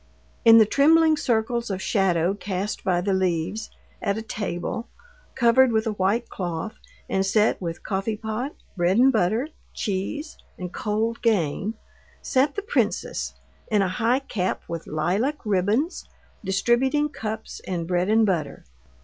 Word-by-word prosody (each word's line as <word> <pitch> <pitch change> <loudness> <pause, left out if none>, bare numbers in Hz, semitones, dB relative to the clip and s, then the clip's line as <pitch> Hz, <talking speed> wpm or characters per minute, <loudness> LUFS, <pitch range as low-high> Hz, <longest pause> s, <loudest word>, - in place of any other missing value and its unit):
In 230 0 +9
the 220 - +8
trembling 315 +6 +5
circles 235 -3 0
of 190 -2 -2
shadow 190 -3 +1
cast 200 0 -4
by 180 -3 +1
the 195 +2 0
leaves, 185 +3 -1 0.3
at 200 -1 0
a 220 - -4
table, 205 0 -4 0.5
covered 240 +1 +5
with 220 0 +1
a 220 - 0
white 205 +4 0
cloth, 180 +3 -4 0.3
and 190 - +1
set 210 +2 +2
with 170 -1 -5
coffeepot, 220 +6 -3 0.2
bread 180 +2 +2
and 265 +2 +5
butter, 220 - +1 0.3
cheese, 220 - -3 0.2
and 180 -1 -6
cold 220 +2 -1
game, 205 -1 +1 0.4
sat 275 +2 +1
the 410 - -3
princess 470 +3 -1 0.3
in 210 -2 +3
a - - +1
high 240 +7 +1
cap 190 -9 -2
with 165 -1 -5
lilac 195 - 0
ribbons, 210 - 0 0.3
distributing 240 +9 +2
cups 220 -6 -6
and 170 -3 -2
bread 180 +1 +1
and 220 +1 +4
butter. 180 -6 -2
215 Hz, 140 wpm, -24 LUFS, 185-235 Hz, 0.5 s, In